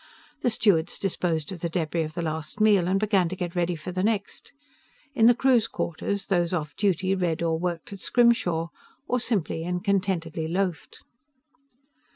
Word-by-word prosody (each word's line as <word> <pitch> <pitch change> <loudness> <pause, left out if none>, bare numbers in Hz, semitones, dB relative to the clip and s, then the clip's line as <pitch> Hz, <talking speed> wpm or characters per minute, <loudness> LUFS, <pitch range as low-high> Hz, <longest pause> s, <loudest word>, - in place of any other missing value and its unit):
The 250 - +1
stewards 195 -7 +2
disposed 170 -5 -1
of 185 - -6
the 170 - -1
debris 165 -1 -1
of 155 -1 -4
the 170 - -2
last 160 +4 -4
meal, 205 -5 +4
and 190 +1 +2
began 195 -5 +2
to 185 - -4
get 175 -2 -4
ready 175 0 0
for 160 +3 -7
the 185 +1 -2
next. 210 0 -2 0.6
In 230 -4 +5
the 240 - +6
crew's 250 -3 +3
quarters, 195 +1 -3
those 175 -2 +1
off 150 -4 -3
duty 190 -2 +1
read 175 -3 -1
or 165 -1 0
worked 175 +2 -3
at 195 - -8
scrimshaw, 180 -9 +2 0.4
or 250 - +1
simply 195 -9 -1
and 180 +1 -3
contentedly 180 -5 -1
loafed. 180 0 -3
180 Hz, 175 wpm, -26 LUFS, 165-200 Hz, 0.6 s, the